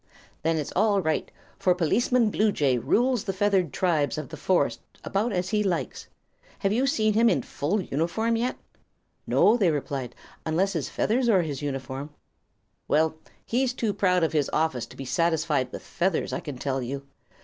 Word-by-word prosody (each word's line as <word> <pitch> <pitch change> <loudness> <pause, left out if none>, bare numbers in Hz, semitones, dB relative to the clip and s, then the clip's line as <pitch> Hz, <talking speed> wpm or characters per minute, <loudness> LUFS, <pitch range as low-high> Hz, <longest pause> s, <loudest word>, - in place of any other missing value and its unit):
"Then 165 +1 +1
it's 150 - -3
all 205 +1 +3
right; 160 -4 -1 0.3
for 180 -1 +3
Policeman 225 +7 +2
Bluejay 150 - +2
rules 235 - +2
the 195 - -1
feathered 190 -4 +1
tribes 160 -5 +1
of 155 -5 -5
this - - -9
forest 185 -2 +1 0.2
about 215 +5 0
as 180 -1 -1
he 210 0 +1
likes. 185 -5 -2 0.5
Have 195 0 0
you 255 +5 +2
seen 215 -5 +2
him 230 +2 +5
in 135 - +1
full 175 +9 -1
uniform 175 +8 0
yet?" 240 +3 -1 0.7
"No," 215 - +5
they 195 -7 +3
replied, 135 -5 -3 0.3
"unless 180 +5 +1
his 160 -6 -2
feathers 240 +3 +1
are 190 -5 +4
his 150 -3 -4
uniform." 135 0 -4 0.8
"Well, 155 +1 +2 0.3
he's 250 +1 0
too 220 -5 -1
proud 180 -3 +2
of 160 - +1
his 150 -3 +1
office 155 -7 0
to - - -15
be 135 - -6
satisfied 160 -4 +1
with - - -7
feathers, 175 0 -1
I - - -1
can 145 -4 -7
tell 135 0 -2
you. 135 +3 -5
175 Hz, 175 wpm, -26 LUFS, 145-210 Hz, 0.8 s, him